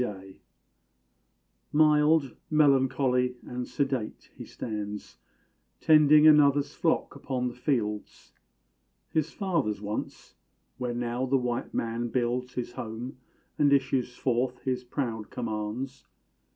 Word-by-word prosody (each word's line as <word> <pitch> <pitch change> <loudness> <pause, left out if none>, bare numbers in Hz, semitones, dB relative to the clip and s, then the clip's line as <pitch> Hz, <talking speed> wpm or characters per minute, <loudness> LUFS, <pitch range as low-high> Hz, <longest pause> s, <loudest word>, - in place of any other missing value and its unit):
_ 95 -5 -5 1.4
Mild, 150 -2 +4
melancholy, 130 -4 +3
and 125 0 -5
sedate, 135 -6 -3
he - - -8
stands, 105 -2 -6 0.6
Tending 155 -1 +6
another's 145 -1 +5
flock 165 -3 0
upon 130 -2 -2
the - - -9
fields, 115 -6 -3 0.8
His 155 0 0
fathers' 165 - -1
once, 105 +1 -6 0.5
where 125 -1 -2
now 120 +2 -2
the 135 +1 +3
white 125 -2 -3
man 115 +1 -1
builds 125 +1 -1
His 125 -1 -3
home, 120 +3 -7 0.4
and 145 -1 +4
issues 130 -2 +1
forth 125 0 -1
his 130 -1 -1
proud 120 -4 -4
commands. 120 +3 -4
125 Hz, 110 wpm, -28 LUFS, 120-140 Hz, 1.4 s, Tending